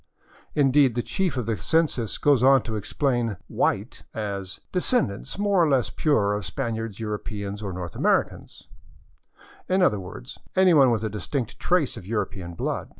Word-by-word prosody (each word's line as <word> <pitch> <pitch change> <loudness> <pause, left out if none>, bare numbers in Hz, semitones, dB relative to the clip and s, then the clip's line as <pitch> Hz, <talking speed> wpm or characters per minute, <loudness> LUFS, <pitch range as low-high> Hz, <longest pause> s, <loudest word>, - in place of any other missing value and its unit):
Indeed, 135 -3 +4
the 120 - 0
chief 185 -8 -1
of 125 - -1
the 115 -1 -1
census 155 -9 0
goes 145 -4 +3
on 135 -1 +6
to 110 - -4
explain 120 -1 -1
*' - - -37
white - - 0
" - - -49 0.3
as 95 -2 -10
" - - -46
descendants, 180 - -1
more 200 -3 +3
or 160 - +3
less 130 -4 +2
pure, 110 -10 +2
of 105 0 -2
Spaniards, 115 +1 -4
Europeans, 105 -1 -4
or 100 -2 -4
North 90 -1 -6
Americans - - -1 0.3
" - - -34
— - - -24
in 185 0 +3
other 105 - +3
words, 100 +8 -9 0.2
anyone 170 -8 +6
with 115 -2 0
a 110 - -1
distinct 115 +3 -4
trace 175 -9 +1
of 95 -4 -10
European 95 -5 -3
blood. - - -3
120 Hz, 180 wpm, -25 LUFS, 105-145 Hz, 0.3 s, on